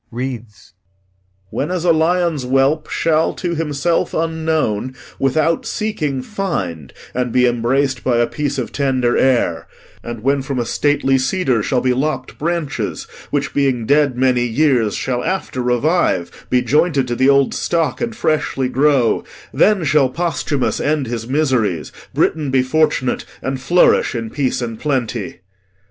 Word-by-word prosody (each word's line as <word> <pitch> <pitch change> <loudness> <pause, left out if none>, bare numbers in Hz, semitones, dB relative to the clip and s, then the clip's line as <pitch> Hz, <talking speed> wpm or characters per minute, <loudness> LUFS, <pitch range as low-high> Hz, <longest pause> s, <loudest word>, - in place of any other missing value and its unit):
[Reads] 115 -7 -7 0.8
'When 145 - -2
as 180 -1 -2
a 175 - +5
lion's 165 -1 +1
whelp 135 +4 +1
shall, 160 -1 +1
to 175 -2 -3
himself 160 +1 -1
unknown, 160 -8 -1 0.2
without 155 +4 +1
seeking 155 -12 -2
find, 100 - -4 0.2
and 125 -1 -1
be 125 +1 +3
embrac'd 125 +2 0
by 125 -2 +1
a 120 - +3
piece 145 +2 -3
of 125 - -3
tender 130 -3 +1
air; 120 -11 +1 0.4
and 120 -2 -7
when 140 +1 +2
from 135 0 -4
a 120 - 0
stately 135 +1 +1
cedar 130 - +1
shall 125 +4 0
be 130 -1 +2
lopp'd 130 0 -3
branches 165 -3 -2 0.3
which, 145 -1 -2
being 130 -5 +1
dead 145 -1 +2
many 125 -1 +2
years, 120 -3 +2
shall 125 -2 -2
after 185 -9 -2
revive, 125 - 0
be 125 -1 +2
jointed 145 +1 +2
to 120 - -2
the 130 +3 +3
old 140 -1 +3
stock, 165 -2 -1
and 235 -1 -2
freshly 150 - 0
grow; 135 -2 +2 0.3
then 205 -4 +3
shall 145 -3 +3
Posthumus 155 -2 -1
end 150 -1 0
his 115 -1 -4
miseries, 125 - 0 0.2
Britain 155 -3 0
be 130 -1 +2
fortunate 140 -2 +1 0.2
and 135 0 -3
flourish 170 -1 +3
in 115 -1 -4
peace 130 -3 -1
and 115 -2 -5
plenty.' 125 -8 -2
135 Hz, 150 wpm, -18 LUFS, 125-155 Hz, 0.8 s, a